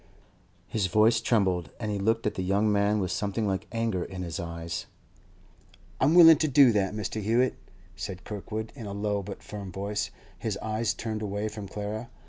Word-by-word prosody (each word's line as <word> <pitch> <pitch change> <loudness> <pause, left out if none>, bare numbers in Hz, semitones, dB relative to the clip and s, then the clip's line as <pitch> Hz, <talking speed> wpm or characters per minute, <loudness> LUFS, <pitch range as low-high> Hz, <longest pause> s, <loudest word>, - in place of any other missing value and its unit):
His 105 -4 0
voice 110 +4 +4
trembled, 95 -8 +1
and 110 -2 -2
he 100 - -2
looked 115 +3 +1
at 105 - +1
the - - -3
young 100 +3 +2
man 105 +1 +2
with 90 -2 -1
something 105 +3 -1
like 95 -1 -2
anger 115 -6 -1
in 95 0 -6
his 85 +1 -4
eyes. 85 -1 -5 1.1
'I'm 150 +5 +4
willing 165 -3 +10
to 155 - +2
do 140 -3 +6
that, 105 -1 0
Mr. 105 +1 -3
Hewett,' 115 +5 +1 0.4
said 90 0 -6
Kirkwood 110 +1 -5
in 115 -6 -7
a 100 - -5
low 100 0 -1
but 100 +1 -8
firm 100 -2 -7
voice, 100 +3 -2 0.3
his - - -2
eyes 110 +1 -1
turned 110 -2 -4
away 105 0 -2
from 105 -2 -7
Clara. 105 +4 -5
105 Hz, 185 wpm, -28 LUFS, 95-110 Hz, 1.1 s, willing